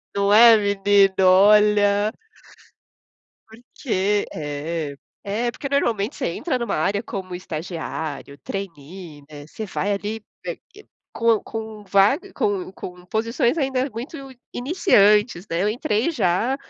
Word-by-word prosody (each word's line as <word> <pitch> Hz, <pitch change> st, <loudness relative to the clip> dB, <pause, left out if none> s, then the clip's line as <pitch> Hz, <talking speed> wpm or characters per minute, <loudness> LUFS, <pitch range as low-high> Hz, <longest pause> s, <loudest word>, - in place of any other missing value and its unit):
Não 200 Hz, 0 st, +2 dB
é 230 Hz, +1 st, +8 dB
menino? 200 Hz, -1 st, +3 dB
Olha. 205 Hz, +2 st, +5 dB, 1.4 s
Porque 220 Hz, -3 st, -2 dB
é. 150 Hz, 0 st, -4 dB, 0.3 s
É, 220 Hz, +4 st, -2 dB
porque 275 Hz, +3 st, -6 dB
normalmente 235 Hz, -4 st, 0 dB
você 265 Hz, -, -2 dB
entra 255 Hz, -, -2 dB
em 240 Hz, -, -2 dB
uma 210 Hz, -, -2 dB
área 200 Hz, +6 st, 0 dB
como 190 Hz, -5 st, -6 dB
estagiário, 160 Hz, -4 st, -6 dB
trainee, 170 Hz, -4 st, -8 dB
né. 145 Hz, -1 st, -10 dB
Você 215 Hz, +7 st, -7 dB
vai 205 Hz, +1 st, -2 dB
ali, 210 Hz, +2 st, -4 dB, 0.2 s
eh -, -, -3 dB, 0.2 s
eh, 420 Hz, -, -14 dB, 0.3 s
com 230 Hz, -2 st, +2 dB
com 220 Hz, -1 st, -7 dB
vário 210 Hz, -, +2 dB
com 200 Hz, -6 st, -2 dB
com 180 Hz, -2 st, -10 dB
posições 230 Hz, -, 0 dB
ainda 265 Hz, -1 st, -1 dB
muito 245 Hz, +9 st, -7 dB, 0.4 s
iniciantes, 215 Hz, -, +3 dB
né. 165 Hz, +2 st, 0 dB
Eu 205 Hz, -, +1 dB
entrei 220 Hz, +4 st, 0 dB
já 235 Hz, -, 0 dB
205 Hz, 130 wpm, -22 LUFS, 185-230 Hz, 1.4 s, é